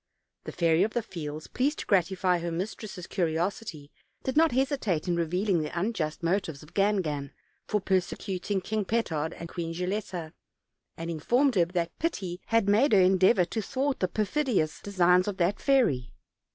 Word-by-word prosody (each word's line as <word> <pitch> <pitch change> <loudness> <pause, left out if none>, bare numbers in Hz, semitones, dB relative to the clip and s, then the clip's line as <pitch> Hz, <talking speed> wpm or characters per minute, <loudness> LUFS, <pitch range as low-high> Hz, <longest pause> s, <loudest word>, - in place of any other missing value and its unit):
The - - -5
Fairy 165 -1 +2
of 215 +3 +1
the 240 - 0
Fields, 155 -4 -6
pleased 285 +4 -1
to - - -5
gratify 185 -1 +2
her 170 0 -3
mistress' 185 +1 -5
curiosity, 170 -3 -2 0.3
did 260 - -2
not 320 +1 +5
hesitate 255 - 0
in 175 - +1
revealing 175 +2 +1
the 155 +3 -3
unjust 170 -7 -2
motives 170 -5 -1
of 150 - -16
Gan 200 0 +2
gan 145 -3 -4 0.4
for 210 - +1
persecuting 190 +1 -1
King 215 +3 -1
Petard 170 -8 -1
and 170 - -8
Queen 165 -1 -5
Gilletta, 180 -3 -3 0.6
and 165 +1 -4
informed 245 - +2
her 180 -5 +4
that 170 -1 -3
pity 190 - -2
had 225 -3 +2
made 220 +6 +4
her 200 - +7
endeavor 185 +1 +5
to 220 +5 -3
thwart 270 +4 -1
the 185 - +1
perfidious 215 - 0
designs 180 -2 +3
of 200 -2 -3
that 180 +3 +1
fairy. 145 - +2
185 Hz, 165 wpm, -28 LUFS, 170-215 Hz, 0.6 s, her